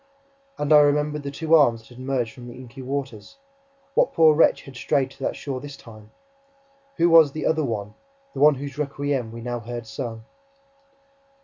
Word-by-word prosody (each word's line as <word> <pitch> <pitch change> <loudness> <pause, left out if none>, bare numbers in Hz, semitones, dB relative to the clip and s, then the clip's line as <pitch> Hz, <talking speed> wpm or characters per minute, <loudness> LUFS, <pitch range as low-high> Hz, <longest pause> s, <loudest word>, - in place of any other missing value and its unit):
And 150 +1 +1
I 150 - +9
remembered 150 +1 +2
the 140 - -5
two 160 +3 -2
arms 120 -8 +5
that 110 - -21
had 120 0 -14
emerged 130 -3 -2
from 125 -1 -11
the 120 - -10
inky 130 +1 -11
waters... 135 - -6 0.6
What - - +2
poor 160 -1 +6
wretch 155 - +3
had 135 - -13
strayed 130 +2 0
to - - -18
that 135 - -2
shore 135 -3 -5
this 140 0 -9
time? 110 -4 -14 0.9
Who 170 0 +4
was 165 -4 +6
'the 155 - -4
other 160 -1 +1
one,' 105 -5 -4 0.4
the - - -6
one 150 0 +6
whose 140 +1 -7
requiem 140 -4 -2
we 115 0 -9
now 120 0 -4
heard 120 +1 -7
sung? 115 0 -6
135 Hz, 190 wpm, -23 LUFS, 120-150 Hz, 0.9 s, I